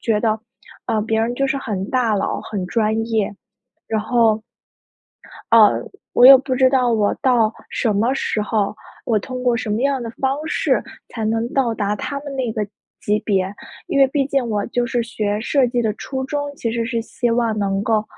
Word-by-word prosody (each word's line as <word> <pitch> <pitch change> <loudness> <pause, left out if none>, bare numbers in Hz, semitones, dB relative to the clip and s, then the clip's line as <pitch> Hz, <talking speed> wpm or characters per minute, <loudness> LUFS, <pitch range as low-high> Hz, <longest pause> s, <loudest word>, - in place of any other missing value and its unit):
觉 220 -3 +1
得， 220 -1 +1 0.5
呃， 220 - +1
别 220 +1 0
人 235 +2 0
就 275 - 0
是 275 +1 0
很 200 -7 -4
大 245 -4 +2
佬、 195 - -1
很 200 -4 -4
专 220 +2 0
业。 220 -3 -1 0.5
然 220 -1 0
后， 220 -1 +2 1.1
呃， 225 -2 +6 0.3
我 245 - +7
也 270 +1 +12
不 260 0 -2
知 260 0 +4
道 255 -2 +2
我 210 -2 +2
到 240 -4 +3 0.2
什 220 -4 0
么 230 +5 +2
时 225 -5 -1
候， 210 -1 -1 0.3
我 225 -3 +2
通 255 +4 -6
过 245 -2 +2
什 220 - -4
么 210 +2 0
样 275 -1 +1
的 230 - -5
方 270 0 +1
式 - - 0 0.2
才 225 -2 -5
能 225 +2 0
到 250 -4 +1
达 205 -1 -1
他 280 +7 -4
们 285 -1 -7
那 250 -4 -1
个 215 - -2 0.4
级 210 +1 +1
别。 190 -3 +1 0.4
因 340 -6 -1
为 275 - +7
毕 275 0 0
竟 275 -3 0
我 210 -3 -1
就 240 0 -1
是 240 -1 0
学 210 -2 -2
设 265 +3 +2
计 245 0 0
的 225 -2 +1
初 265 +4 -5
衷， 290 +1 -3
其 235 -4 -3
实 230 0 -1
是 230 -1 -2
希 235 +1 -2
望 230 -2 +1
能 195 -1 0
够， 215 0 +1
230 Hz, 220 characters per minute, -20 LUFS, 215-255 Hz, 1.1 s, 也